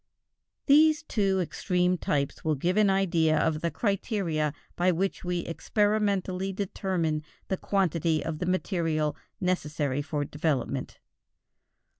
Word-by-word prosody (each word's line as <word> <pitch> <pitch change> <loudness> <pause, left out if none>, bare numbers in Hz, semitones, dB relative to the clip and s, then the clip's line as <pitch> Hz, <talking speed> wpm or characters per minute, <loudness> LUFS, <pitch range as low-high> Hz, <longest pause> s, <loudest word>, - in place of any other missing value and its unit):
These 310 +3 +5
two 195 -9 +1
extreme 180 +1 0
types 145 -4 -2
will 155 -1 +1
give 175 +7 0
an 210 -1 +4
idea 170 -5 +2
of 155 -1 +1
the 170 - 0
criteria 180 - -1 0.2
by 180 +1 +3
which 185 +3 -1
we 175 -1 -1
experimentally 200 0 0
determine 185 -5 -1 0.3
the 190 - 0
quantity 170 -6 0
of 160 -2 -3
the 180 - -2
material 165 -5 0 0.2
necessary 150 -6 -1
for 145 -1 -2
development. 140 -3 -2
180 Hz, 120 wpm, -28 LUFS, 155-195 Hz, 0.3 s, These